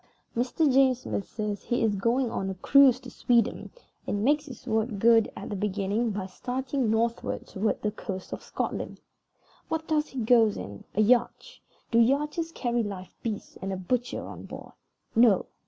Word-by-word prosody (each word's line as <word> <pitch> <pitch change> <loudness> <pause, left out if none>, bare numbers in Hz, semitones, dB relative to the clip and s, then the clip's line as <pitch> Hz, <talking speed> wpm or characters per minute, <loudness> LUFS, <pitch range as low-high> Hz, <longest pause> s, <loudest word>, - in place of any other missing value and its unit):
Mr. 250 +7 +1
James 260 -2 +4
Smith 200 - -3
says 210 -2 -3
he 240 -1 0
is 220 -2 +2
going 235 +5 +1
on 195 -4 -2
a 190 - -4
cruise 265 +5 +5
to 255 -2 -11
Sweden, 235 -2 +1 0.4
and 205 0 -1
makes 295 +4 +2
his 255 -4 -11
word 220 -2 0
good, 225 +1 +5
at - - -7
the - - -2
beginning, 205 +3 -1
by 200 -2 -3
starting 255 +5 -2
northward 230 +1 -1
toward 205 +2 -2
the 210 - +1
coast 190 -3 -6
of - - -5
Scotland. - - -4 0.7
What 320 0 -3
does 305 -1 +1
he 265 - -6
go 230 0 +5
in? 100 - -6
A 215 - +3
yacht. 250 - +1 0.3
Do 230 - +4
yachts 295 +7 +1
carry 240 -5 -1
live 195 -4 -6
beasts 220 -3 -5
and 195 - -3
a 190 - -2
butcher 245 +7 -2
on - - -9
board? - - -9 0.4
No. 225 -4 +5
230 Hz, 175 wpm, -27 LUFS, 205-255 Hz, 0.7 s, cruise